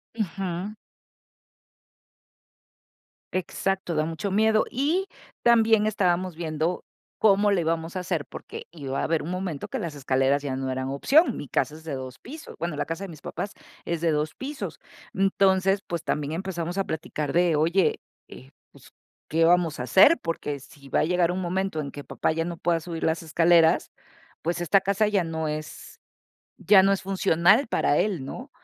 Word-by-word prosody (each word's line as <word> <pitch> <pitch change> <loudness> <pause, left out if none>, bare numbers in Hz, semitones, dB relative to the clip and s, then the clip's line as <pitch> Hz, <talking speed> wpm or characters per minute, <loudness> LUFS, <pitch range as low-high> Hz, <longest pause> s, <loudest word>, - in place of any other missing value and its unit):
Ujú. 195 -1 -3 2.6
Exacto, 185 -1 -2
da 155 0 +1
mucho 165 +5 -3
miedo. 220 +1 +3
Y 320 +10 0 0.4
también 225 -2 +5
estábamos 185 -4 0
viendo 160 +1 -2 0.3
cómo 205 -1 +4
le 190 - +2
íbamos 165 +1 -2
a 185 - -2
hacer, 175 -4 -2
porque - - -9
iba 135 -5 -4
a - - -2
haber 165 -1 0
un 170 - -5
momento 180 -6 -4
que - - -4
las 160 -3 -5
escaleras 135 +1 +1
ya 135 -2 -2
no 135 0 -3
eran 130 0 -3
opción, 275 - +3
mi 145 - -7
casa 150 - 0
es 160 - -12
de 160 -3 -5
2 130 -1 -7
pisos, 310 +5 -10
bueno, 170 -2 -3
la 145 - -2
casa 165 +4 -4
de - - -7
mis 155 -4 -11
papás 200 - -5 0.3
es 170 -1 -2
de 165 - +2
2 150 0 -1
pisos. 275 +2 -6 0.3
Entonces, 195 0 +2
pues, 170 -2 -4
también 150 -2 -2
empezamos 175 0 -4
a 195 - +2
platicar 155 -2 -4
de: 175 -2 +3
"Oye, 170 +5 +2 0.3
eh, 130 +2 -13 0.2
pues, - - -18 0.4
¿qué 165 +1 +2
vamos 170 -4 +3
a - - -2
hacer? 190 - +6
Porque 150 -4 -3
sí 140 0 -16
va - - +2
a - - +3
llegar 175 0 +2
un 185 +1 -3
momento 185 -2 -1
en 140 -2 -6
que 145 - -8
papá - - -1
ya 165 +1 -1
no 175 -1 -4
pueda 170 0 +1
subir 165 0 -6
las 160 +1 0
escaleras, 165 +1 +3 0.5
pues 170 +1 -2
esta 185 +3 +4
casa 200 +2 +1
ya 200 -4 +1
no 160 -1 -3
es 150 0 -7 0.6
ya 195 -2 +6
no 195 +1 +4
es 195 - -2
funcional 195 - +3
para 145 - +1
él, 190 -10 0
¿no? - - -8
170 Hz, 180 wpm, -25 LUFS, 155-195 Hz, 2.6 s, hacer